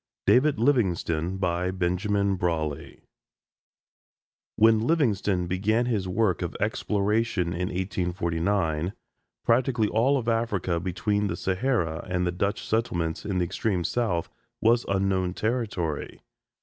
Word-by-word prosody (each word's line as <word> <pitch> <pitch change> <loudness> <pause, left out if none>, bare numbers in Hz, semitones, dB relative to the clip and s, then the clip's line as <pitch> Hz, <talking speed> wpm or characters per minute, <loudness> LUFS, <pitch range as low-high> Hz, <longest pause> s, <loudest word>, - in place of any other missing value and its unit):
DAVID 140 +2 +4
LIVINGSTONE 95 - +1
BENJAMIN 95 +2 0
BRAWLEY 80 -5 -3 1.5
When 110 0 +5
Livingstone 105 - +1
began 105 +7 +1
his 105 -6 -1
work 95 -2 +1
of 85 - -3
exploration 105 -3 0
in 90 +2 -2
1849, 90 -1 -1 0.5
practically 120 -2 +2
all 130 +6 +3
of 120 -3 -4
Africa 105 -7 0
between 100 +4 -1
the - - -2
Sahara 95 -5 -1
and 90 0 0
the 90 - 0
Dutch 100 +4 -2
settlements 85 -8 -1
in 100 -3 -1
the 90 - +2
extreme 95 0 -1
South 90 -2 -1 0.3
was 115 +2 +3
unknown 95 -2 0
territory. 105 - -2
95 Hz, 110 wpm, -26 LUFS, 90-110 Hz, 1.5 s, When